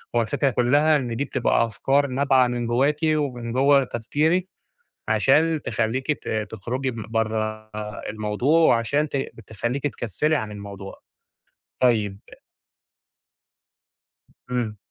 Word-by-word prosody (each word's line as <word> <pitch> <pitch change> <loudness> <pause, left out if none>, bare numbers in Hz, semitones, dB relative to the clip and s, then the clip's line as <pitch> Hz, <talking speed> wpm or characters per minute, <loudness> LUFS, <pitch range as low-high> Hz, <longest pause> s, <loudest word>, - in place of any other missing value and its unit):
هو 120 - +4
الفكرة 115 +5 0
كلّها 145 +5 +3
إن 120 -4 -3
دي 140 +5 -1
بتبقى 130 -3 +1
أفكار 135 +6 +1
نابعة 130 -1 +3
من 120 -1 -2
جواكِ، 135 +5 +2
ومن 140 -7 0
جوّه 135 +2 +4
تفكيرِك 150 +10 0 0.6
عشان 160 0 +3
تخلّيكِ 125 +6 -1
ت - - -11 0.2
تخرُجي 125 +5 -3
م 115 -3 -7
برّا 110 -1 -2 0.4
الموضوع، 110 +9 +1
وعشان 145 +1 +2
ت - - -5 0.3
تخليكي 120 +7 -2
تكسِّلي 130 - -1
عن 110 -7 -2
الموضوع. 100 -1 -9 0.8
طيّب 110 -6 +2 2.3
إمم. 120 -4 -2
125 Hz, 115 wpm, -24 LUFS, 110-140 Hz, 2.3 s, هو